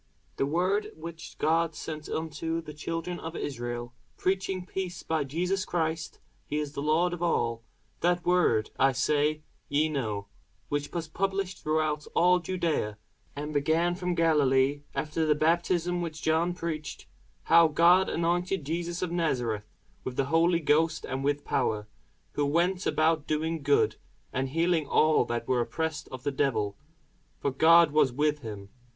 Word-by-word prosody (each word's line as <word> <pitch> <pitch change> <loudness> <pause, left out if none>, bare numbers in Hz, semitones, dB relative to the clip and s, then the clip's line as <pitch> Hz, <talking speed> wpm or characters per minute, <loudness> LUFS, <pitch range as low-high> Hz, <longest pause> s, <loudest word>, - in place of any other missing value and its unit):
The 135 - +1
word 185 +7 0
which 165 0 -9
God 165 0 +1
sent 155 -1 -6
unto 160 +1 -2
the 150 -2 -8
children 165 +3 -4
of 160 +1 -6
Israel, 120 -2 -4 0.2
preaching 190 -1 -1
peace 180 -2 -5
by 160 -2 0
Jesus 180 +7 -1
Christ: 160 -1 -2 0.3
(he 150 - -2
is 150 -1 -3
Lord 155 +5 +1
of 175 - -6
all:) 115 -9 0 0.4
that 175 0 +1
word, 175 -12 +2
I 135 0 +4
say, 150 +4 +1 0.3
ye 150 +2 +2
know, 110 -9 -2 0.4
which 145 0 -2
was 170 -2 -3
published 195 +2 -2
throughout 155 -1 0
all 180 +1 +5
Judæa, 170 - -1 0.4
and 150 +1 -5
began 160 +4 +2
from 180 -1 -2
Galilee, 145 -4 +3
after 155 +1 -1
the 155 -1 +3
baptism 175 +2 +1
which 160 -2 -5
John 165 +2 +1
preached; 155 -3 -5 0.4
how 165 0 +6
God 170 +4 +5
anointed 175 0 0
Jesus 170 +3 -2
of 180 - -2
Nazareth 120 -11 -1 0.3
with 125 - -5
the 135 - +1
Holy 170 +1 +4
Ghost 160 +2 +2
and 130 +1 -3
with 145 +1 0
power: 110 -5 0 0.4
who 145 -1 0
went 175 +5 +1
about 155 -1 +2
doing 160 +1 -1
good, 140 0 +2 0.4
and 130 +1 -1
healing 165 0 +1
all 155 +1 +4
that 120 0 -3
were 125 -2 +2
oppressed 160 +5 -3
of 130 -1 -7
the 145 - 0
devil; 115 -8 0 0.6
for 140 - -1
God 165 +3 +6
was 145 -4 +3
with 150 +3 +1
him. 105 -6 -8
160 Hz, 155 wpm, -28 LUFS, 145-170 Hz, 0.6 s, how